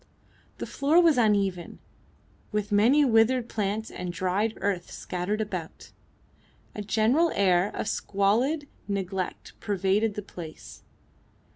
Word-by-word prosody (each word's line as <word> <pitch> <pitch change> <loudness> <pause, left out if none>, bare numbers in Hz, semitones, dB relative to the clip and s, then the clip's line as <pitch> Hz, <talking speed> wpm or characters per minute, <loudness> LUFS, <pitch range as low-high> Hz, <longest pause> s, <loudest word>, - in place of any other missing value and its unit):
The - - -4
floor 290 +5 +2
was 325 -7 +5
uneven, 200 -5 +1 0.7
with 210 0 -2
many 240 +9 +5
withered 235 +1 +3
plants 215 0 -2
and 180 -1 -5
dried 185 +5 -1
earth 190 -3 -2
scattered 185 +4 -3
about. 185 -6 -6 0.8
A 210 - -5
general 230 +11 +2
air 185 -1 +3
of - - -3
squalid 235 +13 0 0.2
neglect 190 -2 -4
pervaded 200 +1 0
the 210 - -4
place. 170 -5 -10
205 Hz, 115 wpm, -27 LUFS, 190-225 Hz, 0.8 s, was